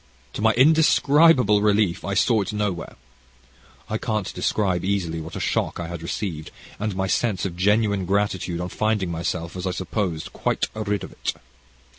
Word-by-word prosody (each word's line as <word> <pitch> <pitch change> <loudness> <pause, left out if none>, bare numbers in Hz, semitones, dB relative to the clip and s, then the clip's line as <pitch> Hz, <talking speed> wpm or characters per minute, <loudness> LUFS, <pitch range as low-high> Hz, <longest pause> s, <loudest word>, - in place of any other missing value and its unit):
To - - -5
my 110 0 +4
indescribable 145 -4 +5
relief 105 -4 +2
I 100 +1 -2
saw 110 +2 +3
it 100 - -3
nowhere. 105 -4 -3 0.9
I 110 - -2
can't 110 -4 -2
describe 95 -5 0
easily 90 -4 -1
what 80 - -8
a - - -4
shock - - -1
I 85 -1 -4
had 85 -1 -6
received, 85 -2 -4 0.3
and 105 -1 -2
my 95 0 0
sense 100 0 0
of 90 -3 -4
genuine 100 0 +2
gratitude 95 -3 0
on 90 - -4
finding 105 -3 0
myself, 85 +1 -3
as 90 +1 -3
I - - 0
supposed, 90 -3 -3
quite - - 0
rid 105 -2 -2
of - - -8
it. - - -3
100 Hz, 170 wpm, -23 LUFS, 90-110 Hz, 0.9 s, indescribable